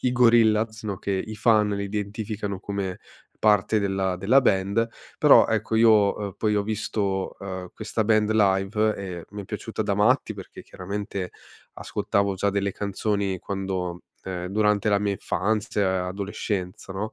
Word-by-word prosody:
i 125 Hz, -, +1 dB
Gorillaz, 115 Hz, -2 st, +4 dB
no, 100 Hz, -3 st, -4 dB
che 100 Hz, -, -3 dB
i 110 Hz, +3 st, -3 dB
fan 105 Hz, -2 st, +3 dB
li 100 Hz, 0 st, -2 dB
identificano 105 Hz, -1 st, -4 dB
come 100 Hz, -2 st, -4 dB, 0.4 s
parte 105 Hz, 0 st, +3 dB
della 95 Hz, -2 st, 0 dB
della 110 Hz, +9 st, +4 dB
band, 100 Hz, +2 st, +2 dB, 0.3 s
però, -, -, +7 dB
ecco 110 Hz, -, 0 dB
io, 110 Hz, -3 st, +5 dB
uhm, 100 Hz, -2 st, -4 dB
poi, 105 Hz, -1 st, +1 dB
ho 100 Hz, -, +2 dB
visto, 100 Hz, -2 st, -2 dB
uhm, 95 Hz, -2 st, -6 dB
questa 110 Hz, 0 st, -2 dB
band 110 Hz, -1 st, +3 dB
live 105 Hz, +1 st, +2 dB
e 90 Hz, -4 st, -6 dB
mi 105 Hz, 0 st, -7 dB
è -, -, -12 dB
piaciuta 110 Hz, +1 st, -5 dB
da 100 Hz, -1 st, 0 dB
matti 110 Hz, +2 st, +2 dB
perché, 95 Hz, -2 st, -10 dB
chiaramente, 100 Hz, -1 st, -5 dB, 0.4 s
ascoltavo 100 Hz, -1 st, -1 dB
già 100 Hz, +2 st, 0 dB
delle 100 Hz, 0 st, 0 dB
canzoni 100 Hz, -1 st, -2 dB
quando 95 Hz, -3 st, -3 dB, 0.2 s
uhm, 90 Hz, -1 st, -4 dB
durante 105 Hz, +1 st, +1 dB
la 100 Hz, -1 st, +3 dB
mia 105 Hz, 0 st, 0 dB
infanzia, 100 Hz, -1 st, -1 dB
adolescenza, 95 Hz, -1 st, -4 dB
no? 105 Hz, +3 st, -4 dB
100 Hz, 155 wpm, -25 LUFS, 95-110 Hz, 0.4 s, però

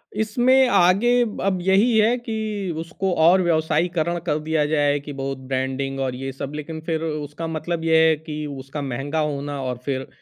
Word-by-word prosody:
इसमें 245 Hz, +5 st, +3 dB
आगे 190 Hz, +4 st, +4 dB, 0.3 s
अब 195 Hz, -1 st, +1 dB
यही 200 Hz, +6 st, +3 dB
है 220 Hz, +3 st, +4 dB
कि 220 Hz, -5 st, -3 dB
उसको 180 Hz, +3 st, -2 dB
और 175 Hz, +4 st, +6 dB
व्यवसायीकरण 170 Hz, 0 st, +1 dB
कर 155 Hz, -3 st, 0 dB
दिया 155 Hz, -1 st, 0 dB
जाए 145 Hz, -1 st, +2 dB
कि 145 Hz, +1 st, -8 dB
बहुत 135 Hz, 0 st, -4 dB
ब्रांडिंग 130 Hz, +1 st, -3 dB
और 130 Hz, -2 st, -1 dB
ये 135 Hz, +1 st, -5 dB
सब, 135 Hz, +1 st, -6 dB
लेकिन 160 Hz, +1 st, -6 dB
फिर 160 Hz, -1 st, -1 dB
उसका 150 Hz, 0 st, -4 dB
मतलब 160 Hz, +1 st, -3 dB
ये 160 Hz, 0 st, +4 dB
है 160 Hz, -, +4 dB
कि 150 Hz, -1 st, -6 dB
उसका 140 Hz, +1 st, -6 dB
महँगा 140 Hz, +3 st, -3 dB
होना 145 Hz, -2 st, -2 dB
और 125 Hz, -1 st, -3 dB
फिर 135 Hz, -2 st, -1 dB
अ, -, -, -10 dB
155 Hz, 180 wpm, -22 LUFS, 140-180 Hz, 0.3 s, और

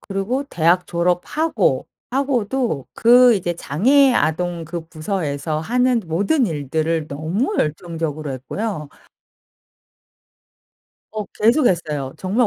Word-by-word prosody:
그리고 205 Hz, +8 st, -2 dB
대학 175 Hz, -, +1 dB
졸업하고 180 Hz, -, 0 dB, 0.2 s
하고도 250 Hz, -, -1 dB
그 245 Hz, +1 st, +6 dB
이제 175 Hz, -2 st, -2 dB
장애 255 Hz, -, +3 dB
아동 170 Hz, -2 st, 0 dB
그 170 Hz, 0 st, -6 dB
부서에서 155 Hz, -3 st, -3 dB
하는 245 Hz, +6 st, +1 dB
모든 205 Hz, -, +1 dB
일들을 155 Hz, 0 st, -1 dB
너무 165 Hz, -, -2 dB
열정적으로 155 Hz, -2 st, -2 dB
했고요. 150 Hz, -, -4 dB, 2.2 s
어 215 Hz, -1 st, -3 dB
계속했어요 175 Hz, -, +1 dB
정말 210 Hz, +6 st, +1 dB
180 Hz, 235 characters per minute, -20 LUFS, 155-240 Hz, 2.2 s, 그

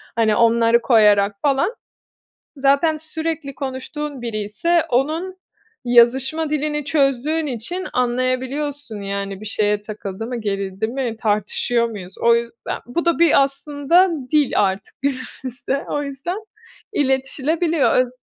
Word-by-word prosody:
hani, 220 Hz, -2 st, +3 dB
onları 230 Hz, +1 st, +4 dB
koyarak 210 Hz, -4 st, +4 dB
falan. 290 Hz, -, +1 dB, 0.8 s
Zaten 280 Hz, +3 st, +3 dB
sürekli 315 Hz, -2 st, -4 dB
konuştuğun 275 Hz, +1 st, -5 dB
biriyse 230 Hz, +10 st, 0 dB
onun 315 Hz, +9 st, 0 dB, 0.5 s
yazışma 265 Hz, +6 st, +4 dB
dilini 300 Hz, -1 st, -1 dB
çözdüğün 300 Hz, +1 st, +1 dB
için 290 Hz, +10 st, -4 dB
anlayabiliyorsun, 255 Hz, 0 st, -1 dB
yani, 200 Hz, 0 st, -4 dB
bir -, -, -8 dB
şeye 210 Hz, -1 st, 0 dB
takıldı 210 Hz, 0 st, -6 dB
mı, 245 Hz, 0 st, -4 dB
gerildi 195 Hz, 0 st, -2 dB
mi, 245 Hz, -1 st, -3 dB
tartışıyor 220 Hz, +3 st, +1 dB
muyuz? 190 Hz, -4 st, -9 dB
O 235 Hz, 0 st, +5 dB
yüzden, 235 Hz, 0 st, -4 dB
bu 290 Hz, +9 st, -2 dB
da 340 Hz, -1 st, +2 dB
bir 330 Hz, -4 st, +6 dB
aslında 290 Hz, +6 st, +2 dB, 0.2 s
dil 300 Hz, -4 st, +3 dB
artık 195 Hz, -1 st, 0 dB
günümüzde. 265 Hz, 0 st, -3 dB
O 290 Hz, -, -1 dB
yüzden 280 Hz, +7 st, -4 dB, 0.6 s
iletişilebiliyor. 290 Hz, +3 st, +1 dB
Öz 255 Hz, -1 st, +2 dB
260 Hz, 120 wpm, -20 LUFS, 225-295 Hz, 0.8 s, bir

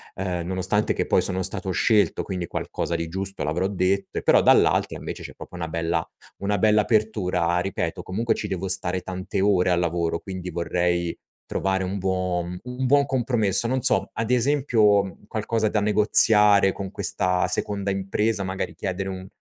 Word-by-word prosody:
uhm, 90 Hz, -3 st, -3 dB
nonostante 95 Hz, +3 st, 0 dB
che -, -, -2 dB
poi -, -, +3 dB
sono 95 Hz, 0 st, -1 dB
stato 95 Hz, 0 st, -3 dB
scelto, 105 Hz, +3 st, +2 dB
quindi 90 Hz, -3 st, -4 dB
qualcosa 85 Hz, -, -4 dB
di 85 Hz, 0 st, -3 dB
giusto 95 Hz, +2 st, -4 dB
l'avrò 85 Hz, +5 st, -1 dB
detto 95 Hz, 0 st, -1 dB
e -, -, -8 dB
però, -, -, +4 dB
dall'altra, -, -, +3 dB
invece, -, -, -7 dB
c'è -, -, -9 dB
proprio -, -, -12 dB
una 85 Hz, -2 st, -4 dB
bella 85 Hz, 0 st, -2 dB, 0.3 s
una 100 Hz, 0 st, -1 dB
bella 105 Hz, +1 st, +4 dB
apertura, 95 Hz, -6 st, 0 dB
ripeto. 90 Hz, -2 st, -3 dB
Comunque 115 Hz, +5 st, -1 dB
ci 105 Hz, -, -4 dB
devo 95 Hz, -1 st, -4 dB
stare 95 Hz, -1 st, 0 dB
tante 95 Hz, +1 st, -4 dB
ore 95 Hz, -2 st, +2 dB
al 85 Hz, -, +2 dB
lavoro, 85 Hz, -1 st, -1 dB
quindi 95 Hz, -2 st, -7 dB
vorrei 85 Hz, 0 st, -1 dB, 0.3 s
trovare 95 Hz, 0 st, -1 dB
un 95 Hz, +2 st, -3 dB
buo 90 Hz, -2 st, -1 dB, 0.2 s
un 125 Hz, +1 st, -4 dB
buon 140 Hz, +2 st, +4 dB
compromesso. 120 Hz, -6 st, +1 dB
Non 130 Hz, +1 st, -1 dB
so, -, -, +3 dB
ad 115 Hz, +2 st, -3 dB
esempio, 120 Hz, -6 st, +3 dB
mhmm, 95 Hz, -, -11 dB
qualcosa 110 Hz, 0 st, -1 dB
da 105 Hz, -, 0 dB
negoziare 105 Hz, -1 st, +6 dB
con 95 Hz, 0 st, -6 dB
questa 90 Hz, 0 st, +1 dB
seconda 100 Hz, -1 st, -1 dB
impresa, 100 Hz, +2 st, -1 dB
magari 95 Hz, +1 st, -4 dB
chiedere 95 Hz, 0 st, -4 dB
un 95 Hz, 0 st, -7 dB
95 Hz, 175 wpm, -23 LUFS, 90-105 Hz, 0.3 s, negoziare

